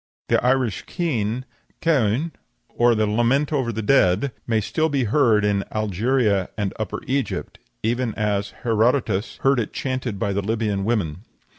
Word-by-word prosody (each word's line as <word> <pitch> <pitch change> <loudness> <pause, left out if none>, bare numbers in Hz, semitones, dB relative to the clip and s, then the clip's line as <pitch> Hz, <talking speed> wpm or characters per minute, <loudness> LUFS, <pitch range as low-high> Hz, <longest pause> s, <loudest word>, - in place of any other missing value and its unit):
"The - - +3
Irish 125 -4 +1
keen 130 - -1 0.3
(caoine), 140 -1 +1 0.4
or 120 0 +3
the 110 0 +2
lament 120 +8 +1
over 130 -5 0
the 110 0 -4
dead, 105 +1 +3 0.2
may 115 -2 +2
still 155 +9 0
be 140 -3 +1
heard 110 -3 +3
in 100 -1 +1
Algeria 110 -1 +1
and 100 -3 -1
Upper 110 - -3
Egypt, 135 0 -2 0.2
even 120 0 0
as 105 -1 0
Herodotus 115 -2 +1
heard 135 -1 +4
it 110 - -3
chanted 130 -5 -3
by 100 +1 -1
the 100 - 0
Libyan 105 -2 -1
women." 100 -9 -1
115 Hz, 150 wpm, -23 LUFS, 105-130 Hz, 0.4 s, heard